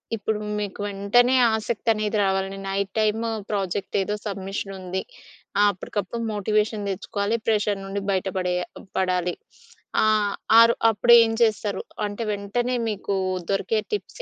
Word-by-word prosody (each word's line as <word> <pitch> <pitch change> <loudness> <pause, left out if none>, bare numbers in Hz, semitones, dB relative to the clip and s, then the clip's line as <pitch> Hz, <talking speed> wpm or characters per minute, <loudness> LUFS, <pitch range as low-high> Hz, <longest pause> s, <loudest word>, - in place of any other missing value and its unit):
ఇప్పుడు 215 0 -2 0.2
మీకు 205 -1 -4
వెంటనే 205 +6 +3 0.2
ఆసక్తి 220 +1 -2
అనేది 215 0 -1
రావాలి. 195 0 0
నైట్ 195 0 -1
టైమ్ 215 +1 +1 0.3
ప్రాజెక్ట్ 195 -2 -2
ఏదో 205 +2 -1
సబ్మిషన్ 195 0 -4
ఉంది. 185 +1 -3 0.6
ఆహ్ 205 - +6
అప్పటికప్పుడు 205 +4 -4
మోటివేషన్ 210 0 0
తెచ్చుకోవాలి. 200 +3 -2
ప్రెజర్ 210 -2 +1
నుండి 200 +1 -3
బయట 190 0 0
పడేయ 180 -1 0 0.4
పడాలి. 180 -1 +1 0.7
ఆహ్, 215 -2 +2 0.3
ఆరో 230 0 +7 0.2
అప్పుడు 235 +3 +4
ఏం 225 - -1
చేస్తారు? 215 -2 0 0.3
అంటే 205 +3 -5
వెంటనే 220 +5 -1
మీకు 200 -1 -2 0.4
దొరికే 215 +2 +1
టిప్స్ 420 +4 -4
205 Hz, 130 wpm, -24 LUFS, 195-215 Hz, 0.7 s, ఆరో